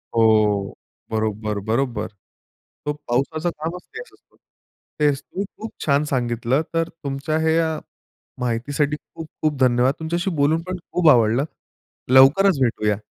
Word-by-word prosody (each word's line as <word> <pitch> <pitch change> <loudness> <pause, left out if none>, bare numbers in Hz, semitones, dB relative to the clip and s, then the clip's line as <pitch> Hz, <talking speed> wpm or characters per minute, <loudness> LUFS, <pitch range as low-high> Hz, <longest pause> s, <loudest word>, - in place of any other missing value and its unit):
हो, 110 -3 +3 0.4
बरोबर, 110 -1 -1
बरोबर. 115 -1 0 0.8
तो 150 - 0
पावसाचं 155 +7 0
कामच 165 +3 -4
तेच 455 +3 -8
असतो. - - -27 0.6
तेच 145 -2 +3
तुम्ही 200 +2 -5
खूप 220 - -7
छान 140 0 +3
सांगितलं, 120 +2 0
तर 165 0 0
तुमच्या 145 0 -3
ह्या 160 -1 +1 0.6
माहितीसाठी 140 +5 0 0.2
खूप-खूप 155 -2 -3
धन्यवाद. 125 +1 +4
तुमच्याशी 170 +3 -1
बोलून 150 +3 +2
पण 185 0 -3
खूप 170 -3 +4
आवडलं. 120 +2 +4 0.7
लवकरच 145 +6 +6
भेटूया. 105 -4 +1
140 Hz, 120 wpm, -22 LUFS, 115-160 Hz, 0.8 s, लवकरच